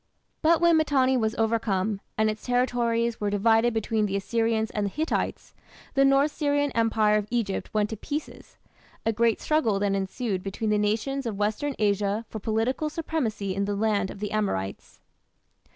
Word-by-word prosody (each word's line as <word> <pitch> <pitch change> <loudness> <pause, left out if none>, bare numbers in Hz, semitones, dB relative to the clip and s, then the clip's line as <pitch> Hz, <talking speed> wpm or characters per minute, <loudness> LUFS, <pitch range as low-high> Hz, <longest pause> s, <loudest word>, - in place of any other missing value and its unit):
But 330 +1 +4
when 340 -1 +5
Mitanni 270 -4 +3
was 220 -3 0
overcome, 220 -3 0 0.2
and 220 0 +3
its 215 0 -3
territories 235 -2 0
were 205 - +1
divided 225 +3 +3
between 220 -1 0
the 195 - -3
Assyrians 225 +2 0
and 210 -1 -1
the - - -2
Hittites, 310 - -2 0.4
the 275 - +4
North 275 +2 +4
Syrian 290 -2 0
Empire 220 -2 +2
of 210 -1 -2
Egypt 230 -5 -2
went 210 0 0
to 220 - -4
pieces. 295 +7 -6 0.5
A 225 - +2
great 230 +1 +2
struggle 260 -10 +1
then 200 0 0
ensued 195 +1 -2
between 200 +3 -3
the 210 - +2
nations 230 +6 -1
of 210 -3 -4
western 215 +7 -1
Asia 205 +1 0
for 220 - -6
political 225 +8 -1
supremacy 245 - -2
in 200 +1 -1
the 205 0 -2
"land 205 -2 +1
of - - -9
the 210 0 -4
Amorites". 100 - -3
220 Hz, 170 wpm, -26 LUFS, 205-250 Hz, 0.5 s, when